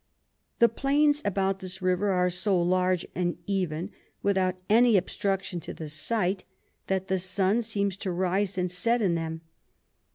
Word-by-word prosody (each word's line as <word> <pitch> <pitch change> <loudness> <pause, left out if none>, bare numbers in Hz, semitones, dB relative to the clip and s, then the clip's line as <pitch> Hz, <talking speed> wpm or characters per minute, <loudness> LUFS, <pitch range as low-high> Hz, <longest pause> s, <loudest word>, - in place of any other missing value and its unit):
The 235 - +6
Plains 290 +5 +2
about 195 -1 0
this 185 0 -6
River 185 +2 +1
are 180 -1 +2
so 185 +1 +2
large 180 0 +1
and 175 -1 -1
even, 185 -2 -2 0.3
without 190 -2 +1
any 230 0 +5
Obstruction 190 0 -2
to - - -8
the 155 -2 -7
Sight, 185 +4 -1 0.4
that 190 0 -1
the 190 -1 0
Sun 190 +4 +1
seems 200 -4 -1
to 195 - -4
rise 190 +2 0
and 180 -1 0
set 230 +6 +1
in 185 -4 +2
them. 160 -1 -3
190 Hz, 155 wpm, -27 LUFS, 180-205 Hz, 0.4 s, The